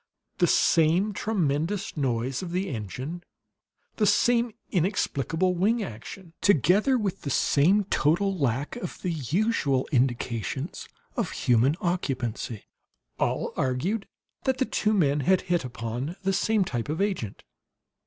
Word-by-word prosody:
The - - +4
same 170 +6 +3
tremendous 185 -1 -1
noise 130 -2 -1
of 185 - -5
the 185 +3 -1
engine, 130 - -5 0.7
the 210 - +3
same 240 +1 +3 0.2
inexplicable 180 - 0
wing 210 +6 +1
action, 165 - -9
together 200 - +4
with 195 -4 -2
the 140 - -4
same 170 +10 +3
total 190 +2 +1
lack 140 - -1
of 245 - -6
the 180 - 0
usual 150 - 0
indications 120 - -1 0.3
of - - -1
human 125 +5 +2
occupancy, 125 - -2 0.6
all - - 0
argued 170 - -1 0.4
that 265 -1 +1
the 260 - +1
two 215 -2 +1
men 150 -6 +3
had 185 +7 +3
hit 175 -3 0
upon 120 +5 -4
the 195 0 +1
same 210 0 +2
type 120 -4 -3
of 155 - -2
agent. 190 - -2
170 Hz, 130 wpm, -26 LUFS, 130-195 Hz, 0.7 s, The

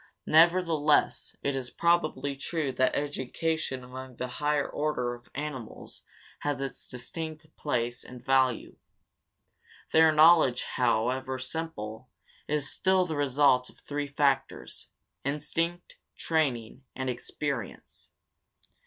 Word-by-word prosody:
Nevertheless 165 -2 +3
it 140 -1 0
is 130 -2 -3
probably 170 -4 +1
true 140 +1 -2
that 130 0 +1
education 145 0 -2
among 130 0 -9
the 125 - -3
higher 150 -1 +2
order 145 -5 -1
of 120 0 -13
animals 140 -5 -6 0.4
has 145 -3 -2
its 135 -1 -4
distinct 155 +5 -7
place 120 -4 -2
and 125 -1 -12
value. 130 -2 +2 1.1
Their 160 0 +6
knowledge, 155 -5 +6
however 125 +2 0
simple, 130 -5 -5 0.4
is 150 -2 0
still 190 -1 +2
the 160 -3 -3
result 140 -2 +3
of - - -19
three 145 0 -4
factors: 140 -1 -1 0.3
instinct, 165 +5 -2 0.2
training, 130 -6 -1
and 130 0 -3
experience. 125 -1 -5
140 Hz, 110 wpm, -29 LUFS, 125-155 Hz, 1.1 s, Their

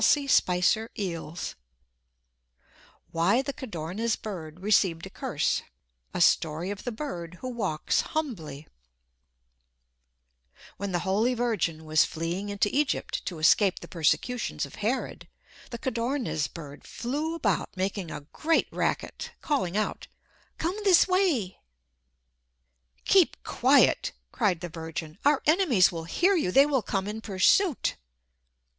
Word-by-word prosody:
[Illustration: 220 -7 +3
Headpiece] 170 -4 -4 1.6
WHY 190 +10 +2
THE 280 +1 -4
CODORNIZ 215 0 -3
BIRD 170 -6 -7
RECEIVED 190 -5 +2
A - - -10
CURSE - - -1 0.5
A - - -1
Story 160 +4 +2
of 205 - -7
the 245 - -2
Bird 180 - -6
Who 255 - -4
Walks 200 -11 0
Humbly 160 - -4 2.1
When 200 0 -4
the 175 -1 -1
Holy 215 +6 +2
Virgin 190 -10 -1
was 155 0 +4
fleeing 170 +5 -3
into 205 +2 0
Egypt 290 -1 0
to 175 - -4
escape 185 +5 +4
the - - -10
persecutions 195 - 0
of - - -13
Herod, 230 +6 -2 0.4
the 235 - -5
Codorniz 235 - -1
bird 145 -3 -10
flew 295 +7 -3
about 330 - -1
making 190 -1 -2
a 150 - -6
great 325 +1 +2
racket, - - -2
calling 210 - -1
out, 215 - -2 0.5
"Come 350 +5 -2
this 380 -3 +6
way." 345 - +1 1.5
"Keep 380 -4 +3
quiet!" - - +3 0.2
cried 190 -7 0
the 175 - -5
Virgin. 160 +1 -7
"Our 290 0 +3
enemies 300 - +4
will 165 -2 -5
hear 365 - +2
you! 305 - +1
They 275 +8 +6
will 280 -4 +1
come 195 -2 -2
in 215 +1 -5
pursuit!" 230 - +2
205 Hz, 125 wpm, -27 LUFS, 170-265 Hz, 2.1 s, this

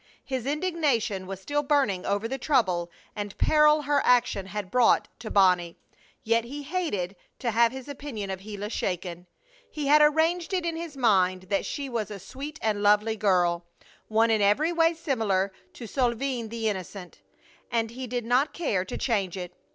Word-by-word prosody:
His 260 -2 -3
indignation 290 - 0
was 195 -1 -6
still 290 +9 -1
burning 275 -11 +1
over 205 +3 0
the 270 +3 -4
trouble 190 - +1 0.3
and 205 -2 -5
peril 300 0 +4
her 290 +1 +2
action 235 -6 +2
had 195 -1 -5
brought 250 -2 +4
to 220 -1 -7
Bonnie. 180 -4 +3 0.5
Yet 230 +1 +2
he 285 +5 -7
hated 280 - -2 0.2
to 240 - -1
have 230 +1 +4
his 265 0 -8
opinion 260 -8 -6
of 190 - -4
Gila 205 +1 -6
shaken. 180 -3 -3 0.4
He 300 -2 -4
had 300 +2 +6
arranged 325 +4 +2
it 360 -2 -1
in 335 -1 -1
his 325 -3 -6
mind 185 -6 +3
that 200 - 0
she 285 -2 -4
was 230 -5 -3
a 205 - -6
sweet 275 - -8
and 215 -2 0
lovely 210 +2 +3
girl, 175 -5 +1 0.4
one 225 +1 +3
in 220 -1 +2
every 240 +12 +3
way 330 0 +3
similar 215 - 0 0.2
to 240 - -9
Solveig 245 -1 -1
the 225 0 -2
innocent, 190 -2 -5 0.5
and 225 -1 0
he 255 +2 -6
did 245 -1 -3
not 250 +5 +2
care 215 - 0
to 190 - -6
change 200 -7 -1
it. 180 -1 -6
225 Hz, 175 wpm, -27 LUFS, 195-285 Hz, 0.5 s, had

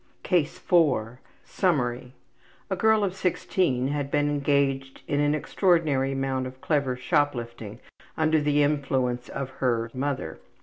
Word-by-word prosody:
CASE 170 -5 +1
4 130 -9 +1 0.2
Summary: 125 -8 -1 0.6
A - - +2
girl 220 +2 +3
of 190 -2 0
16 170 -8 0
had 145 -1 -2
been 145 0 +1
engaged 140 -2 0
in 145 - 0
an 145 +1 +2
extraordinary 155 -6 +1
amount 135 -1 -1
of 130 0 -11
clever 140 -3 0
shoplifting 120 -5 -2 0.4
under 155 -1 +2
the 145 0 +2
influence 130 -4 0
of 135 -1 -5
her 115 -3 0
``mother.'' 140 +1 -3
140 Hz, 130 wpm, -26 LUFS, 130-150 Hz, 0.6 s, girl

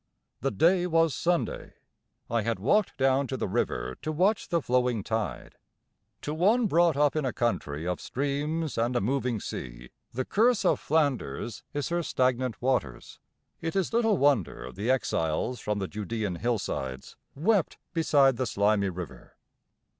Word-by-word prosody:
The - - 0
day 175 - +3
was 165 -3 +3
Sunday. 175 +4 -1 0.5
I 115 0 0
had 115 0 -1
walked 175 - +1
down 135 +1 +2
to 130 - -3
the - - -2
river 65 -8 -2
to 155 - -2
watch 190 +7 +1
the 170 -2 +2
flowing 125 -5 +1
tide. 100 - -3 0.7
To 150 - -3
one 210 +9 +3
brought 170 -5 +3
up 145 0 +3
in 155 - 0
a 130 - 0
country 80 -12 -2
of 90 -3 -2
streams 145 +2 -2
and 120 +2 0
a - - +3
moving 125 +1 0
sea - - -7 0.2
the 130 +2 -3
curse 230 +2 +2
of - - +3
Flanders 140 -7 -1
is 145 +2 -3
her 175 0 0
stagnant 130 -6 0
waters. 125 - -1 0.4
It 165 +2 -3
is 195 +2 0
little 225 -3 +3
wonder 115 - +1
the 105 - -4
exiles 120 -3 0
from 105 0 -2
the 95 -2 -2
Judaean 105 -2 -3
hillsides 85 - -3 0.2
wept 185 +5 +1 0.2
beside 140 -6 +4
the 130 - -1
slimy 100 -1 +2
River. 90 -3 -8
130 Hz, 155 wpm, -28 LUFS, 105-160 Hz, 0.7 s, beside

